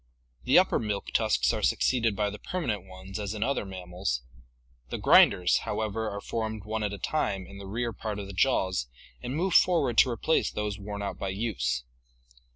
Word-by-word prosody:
The 130 - +5
upper 185 +1 +4
milk 105 -3 -3
tusks 65 - +2
are - - -2
suc - - +2
ceeded 115 -5 +2
by 105 0 0
the 105 - -8
permanent 115 - -3
ones 95 +2 -8
as 105 0 -3
in 105 - -1
other 135 -5 -1
mammals; 90 -9 -3 0.7
the - - -3
grinders, 90 -1 +5
however, 110 0 -2
are 100 0 -5
formed 110 -2 -3
one 110 +1 -2
at 105 -1 -1
a 100 - -5
time 100 -8 -1
in 100 +1 -11
the 100 - -8
rear 115 +3 -2
part 105 0 -4
of 100 - -5
the 100 - -8
jaws 95 - +1 0.3
and 125 - -4
move 180 +3 0
forward 150 -12 +4
to 130 - +6
replace 125 +7 +1
those 105 -1 -3
worn 100 0 -5
out 100 - -4
by 95 - -2
use. 95 - -1
105 Hz, 195 wpm, -28 LUFS, 95-115 Hz, 0.7 s, to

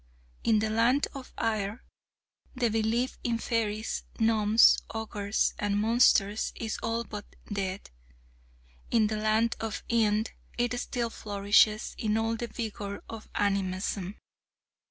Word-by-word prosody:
In 225 -1 +4
the 215 0 0
Land 235 +6 +3
of 275 -3 -9
Ire, 215 -1 -1 0.7
the 245 -2 +1
belief 225 +4 0
in 235 -1 0
fairies, 220 -1 -1 0.2
gnomes, 220 0 +5
ogres 215 -2 -1
and 205 -1 0
monsters 215 -2 +3
is 220 -1 -4
all 230 0 -1
but 210 -2 -7 0.3
dead; 195 -1 -3 1.0
in 225 -2 +4
the 215 0 -1
Land 215 +2 +2
of 225 -2 -4
Ind 220 -1 +2 0.3
it 240 0 +1
still 235 -2 -2
flourishes 205 +1 +2
in 215 -1 +1
all 225 0 0
the 235 +1 -4
vigour 210 -3 -5
of 225 -1 -8
animism. 195 -1 -1
220 Hz, 125 wpm, -29 LUFS, 205-230 Hz, 1.0 s, gnomes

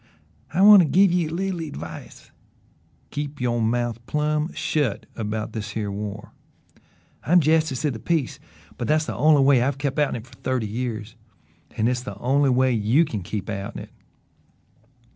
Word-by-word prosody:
"I 190 - +2
want 205 -1 +9
to 165 - +2
give 190 +4 +4
ye 175 -2 +1
a - - -7
leetle 185 +1 -2
advice. 85 - -8 0.8
Keep 145 0 -5
yo' 120 -1 0
mouth 120 0 -1
plum' 150 +2 0
shut 145 -10 -1
about 110 -1 -4
this 105 -1 -5
here 105 -2 -2
war. 100 0 -6 0.9
I'm 175 +2 +5
Jestice 155 -3 +1
of 145 - +1
the 110 - -7
Peace, 160 -3 -1 0.4
but - - -2
that's 155 +1 +2
the - - -4
only 150 -2 +4
way 135 -3 +5
I've 135 +2 0
kept 140 +1 -2
outen 145 -3 +1
of 115 - -6
it - - -18
fer 120 -1 -18
thirty 130 -3 -1
years; 115 0 -4 0.6
an' 110 - +1
hit's 125 +1 +1
the 115 -6 -8
only 135 +5 +2
way 130 +1 +3
you 120 +8 +3
can 110 -9 -4
keep 100 +3 -5
outen 100 -2 -5
it." - - -15
130 Hz, 180 wpm, -23 LUFS, 110-150 Hz, 0.9 s, want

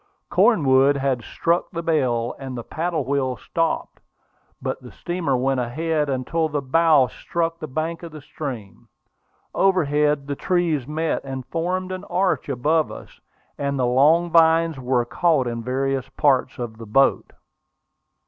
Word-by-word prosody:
Cornwood 140 - +4
had 135 -3 0
struck 170 +7 0
the 170 -1 -5
bell, 125 -8 0
and 130 -2 -6
the 120 - -5
paddle 160 -1 -2
wheel 130 -2 -1
stopped. 165 -1 -2 0.6
But - - -4
the - - -12
steamer 170 -7 -2
went 135 +1 0
ahead 150 +5 -1
until 150 +5 -1
the 150 -1 -1
bow 155 0 +4
struck 165 +8 -3
the 155 - -5
bank 155 +4 -3
of 170 -1 -8
the 155 - -9
stream. 125 - -7 0.7
Overhead 150 -6 +2
the 140 0 -3
trees 165 -6 0
met, 160 +2 -1
and 135 -2 -6
formed 185 +3 -2
an 185 +1 -5
arch 180 -3 0
above 150 +5 +1
us, - - -12 0.4
and 140 -1 -1
the 130 - +1
long 155 +8 +3
vines 165 -2 +4
were 125 -1 0
caught 155 +1 +1
in 120 -1 -3
various 135 +2 -2
parts 130 -3 +1
of 120 -3 -6
the 115 - -9
boat. 135 +6 +2
145 Hz, 150 wpm, -22 LUFS, 130-165 Hz, 0.7 s, Cornwood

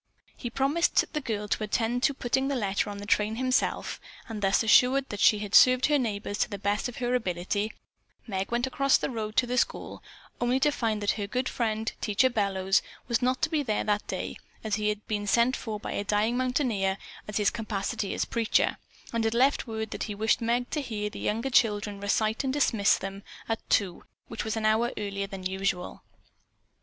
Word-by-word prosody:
He 240 - -5
promised 275 +7 +2
the 300 - -1
girl 210 -5 -3
to 215 - -1
attend 230 +3 0
to 280 - +2
putting 265 +1 0
the 280 - -1
letter 200 -4 0
on 205 - -6
the 200 - -7
train 210 +1 +1
himself, 255 +2 0 0.3
and 220 -3 -6
thus 195 +3 +3
assured 255 +5 +5
that 205 - -5
she 210 - +5
had 205 0 -6
served 255 0 +7
her 295 -1 +3
neighbors 205 -3 -3
to - - +1
the 200 - -5
best 205 +4 -1
of 245 - -10
her 245 0 -1
ability, 205 -1 -1 0.5
Meg 195 -2 -3
went 240 +1 +1
across 275 +1 +3
the - - -3
road 215 -2 -4
to 255 - +4
the 250 +1 +1
school, - - -2 0.4
only 245 +2 +1
to 295 - +4
find 220 -6 -1
that 205 - +3
her 200 - -2
good 255 +5 -1
friend, 220 -1 -1
Teacher 220 +5 +2
Bellows, 195 -3 +1 0.3
was 235 0 +1
not 255 +1 0
to 315 - +3
be 310 -2 +1
there 220 -7 -1
that 210 0 0
day - - -4 0.3
as 220 -1 -3
he 210 0 0
had 210 0 -4
been 205 -1 -2
sent 235 +5 +3
for 215 -2 -5
by - - -6
a - - -2
dying 210 +3 +1
mountaineer 245 -7 0 0.3
in 210 - -6
his 210 -1 +3
capacity 210 -3 -3
as - - 0
preacher, 230 -2 +1 0.4
and 230 -1 0
had 225 +1 0
left 265 +2 +3
word 220 -1 -4
that - - -3
he 210 - -5
wished 220 +3 +1
Meg 240 +2 0
to 300 - -1
hear 210 -5 -4
the - - -8
younger 230 +5 -1
children 205 -4 +2
recite, 215 +4 +1
and 265 - 0
dismiss 225 -8 +3
them 195 +1 -6 0.3
at 225 -1 -1
two, 190 -4 +1 0.3
which - - -4
was 220 +1 -2
an 220 - -1
hour 220 +2 +3
earlier 200 -1 -3
than 195 -1 -8
usual. 190 -1 -2
220 Hz, 210 wpm, -28 LUFS, 205-250 Hz, 0.5 s, served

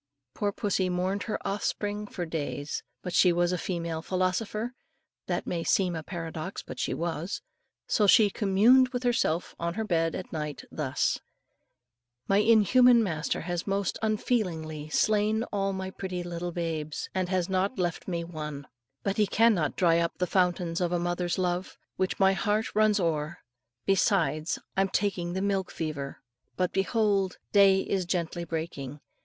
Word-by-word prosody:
Poor 205 -1 -1
pussy 195 -2 0
mourned 185 +3 -1
her - - 0
offspring 205 +1 -2
for 180 - -5
many 165 - -8
days, 145 -2 -3 0.2
but 180 - -4
she 180 - +5
was 175 +1 +2
a 180 - 0
female 170 -3 -3
philosopher 195 +6 -1 0.5
that - - -1
may 170 -1 -2
seem 180 -1 +2
a 160 - -3
paradox, 165 +1 -5
but - - -8
she - - -1
was; 170 +2 -3 0.4
so 210 - +2
she 210 0 +6
communed 230 +7 +5
with 250 0 -3
herself 230 -8 +1
on 170 0 -2
her 220 - -1
bed 165 -5 +1
at 185 - -7
night, 150 -3 -4
thus, - - 0 1.1
"My 195 - +3
inhuman 230 +3 +6
master 160 -6 -2
has 175 +2 -3
most 195 -1 -1
unfeelingly 175 -9 -1
slain 215 +5 +2
all 195 -1 +1
my 190 0 -4
pretty 185 -2 -4
little 175 0 -4
babes, 160 -3 -3
and 185 -1 -1
has 185 -2 +1
not 190 +4 0
left 175 -3 -2
me 170 -2 -2
one; 150 -4 -6 0.4
but 195 -1 -1
he 210 -1 +3
cannot 205 -8 +3
dry 170 -3 +4
up 170 0 -1
the 180 - +1
fountains 180 -2 +1
of 175 -1 +1
a 175 - +2
mother's 175 0 -1
love, 180 0 -1 0.2
with 185 0 +2
which - - -24
my 195 0 +5
heart 210 +2 0
runs 215 -1 +4
o'er; 160 -2 -1 0.5
besides, 170 -5 +2 0.2
I'm 195 0 +2
taking 185 -3 -1
the 190 +1 -1
milk 195 -2 0
fever. 145 -4 -5 0.3
But 180 -1 0
behold, 195 -1 +1
day 195 -2 +6
is 190 -2 -1
gently 170 -1 -2
breaking. 155 -4 -5
185 Hz, 165 wpm, -28 LUFS, 170-200 Hz, 1.1 s, she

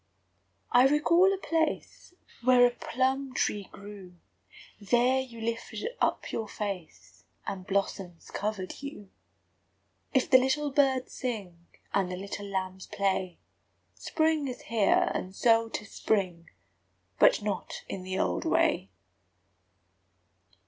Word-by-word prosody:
I 250 +2 +7
recall 335 +6 +4
a 390 - 0
place 330 0 -2 0.3
Where 250 0 +6
a 245 - +3
plum 260 +2 -1
tree 205 -2 -1
grew; 200 -3 -11 0.6
There 245 +5 +3
you 245 -3 -6
lifted 230 - -3
up - - 0
your 225 - -3
face, 155 - -6 0.2
And 185 -2 -5
blossoms 195 -3 -2
covered 205 -1 -4
you. 280 -9 -8 1.0
If 265 -3 +2
the 260 - +7
little 285 +3 0
birds 270 -2 +2
sing, 195 -9 -5 0.3
And 195 -2 +1
the - - -3
little 200 +1 -6
lambs 190 -1 -4
play, 190 -3 -1 0.6
Spring 315 -3 0
is 250 - -6
here; 220 -3 +2
and 185 +1 -4
so 230 0 +3
âtis 210 -2 -5
spring 180 -6 -1 0.7
But - - +5
not 205 -3 -4
in 190 - -5
the 185 +1 -4
old 90 -2 0
way! 95 - +2
215 Hz, 120 wpm, -29 LUFS, 190-260 Hz, 1.0 s, I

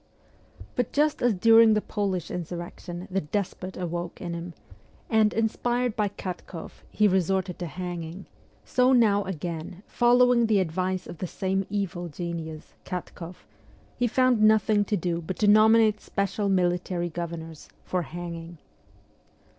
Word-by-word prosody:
But 245 -2 -1
just 300 +1 +2
as 245 -3 +3
during 225 +2 +6
the - - +3
Polish 195 -5 -3
insurrection 175 +1 -6
the 195 +1 0
despot 185 +2 -4
awoke 175 -1 -4
in 175 -2 -5
him, 170 0 -6 0.6
and, 220 -1 +4
inspired 240 +2 0
by 210 -1 +1
Katkoff, 180 -3 -8
he 210 - +3
resorted 190 -1 0
to 175 - -3
hanging, 175 +2 -6 0.4
so 255 +1 +3
now 210 -5 +4
again, 170 +1 -5
following 245 -1 +4
the 215 -2 +3
advice 185 +1 -1
of 170 - -9
the 185 - -3
same 190 +2 -2
evil 195 -3 -3
genius, 165 -1 -6
Katkoff, 180 -1 -7 0.5
he 245 - +1
found 255 -1 +3
nothing 215 -1 +4
to 210 - 0
do 170 -1 -2
but 175 +3 -5
to 210 - +2
nominate 215 0 +5
special 200 +1 -1
military 175 -1 0
gover 170 0 -4
nors 160 -1 -10 0.2
for 180 - -1
hanging. 170 0 -7
185 Hz, 140 wpm, -26 LUFS, 175-215 Hz, 0.6 s, during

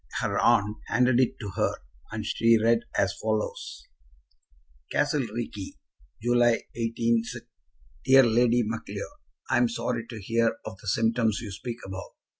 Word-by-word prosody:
Her - - 0
aunt 105 +2 +3
handed 125 0 +3
it 130 - +2
to 105 - -5
her, - - +1 0.4
and - - -4
she 115 0 +4
read 115 +1 +4 0.2
as 100 0 +2
follows: 110 -1 -3 1.1
Castle 150 - +1
Reekie, 105 -5 -5 0.5
July, 120 -1 +3
186. 115 0 -1 0.6
DEAR 135 0 +7
LADY 120 +1 +3
MACLEOD, 115 - -5 0.4
I - - +4
am 120 -1 +3
sorry 115 0 -3
to 115 -3 -8
hear 115 +3 +1
of 95 - -7
the - - -11
symptoms 115 +1 +2
you 110 -3 -7
speak 115 +4 -6
about. 95 0 -8
115 Hz, 140 wpm, -27 LUFS, 110-120 Hz, 1.1 s, DEAR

